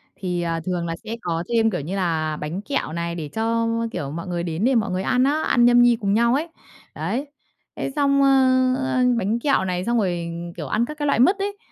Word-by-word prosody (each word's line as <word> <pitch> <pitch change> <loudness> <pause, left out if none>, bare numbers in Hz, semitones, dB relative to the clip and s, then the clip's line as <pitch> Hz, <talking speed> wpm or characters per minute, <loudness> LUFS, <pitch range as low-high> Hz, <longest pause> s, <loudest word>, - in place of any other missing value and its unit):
Thì, 180 -2 -3
à, 165 -1 -1
thường 175 -2 -2
là 165 0 -3
sẽ 225 - -5
có 165 0 -2
thêm, 225 -1 +3
kiểu 180 -6 -2
như 175 +7 -4
là, 160 -4 -1
bánh 165 +6 -4
kẹo 275 - -3
này 170 0 -3
để 155 -3 -5
cho, 230 +1 0 0.2
kiểu, 140 -1 -4
mọi 170 +4 -6
người 175 -1 -2
đến 170 +2 -3
để 260 -1 +3
mọi 210 -5 +1
người 185 +1 -2
ăn 250 +4 +2
á, 295 +3 +1
ăn 240 -1 +3
nhâm 240 0 +6
nhi 240 -1 +5
cùng 200 0 +1
nhau 235 +3 +3
ấy, 310 +5 0 0.5
đấy. 275 +5 -3 0.5
Thế - - -3
xong, 280 -1 +3
ơ, 260 -1 +4
ơ, 260 -1 0
bánh 215 +3 0
kẹo 275 -7 +1
này 180 0 -2
xong 235 0 +1
rồi, 175 -5 -1 0.3
kiểu, 150 -5 -5
ăn 225 - +1
các 300 +2 -8
cái 295 - -2
loại 280 -5 +2
mứt 370 +11 +5
ấy, 405 +1 -3
220 Hz, 240 wpm, -22 LUFS, 170-255 Hz, 0.5 s, nhâm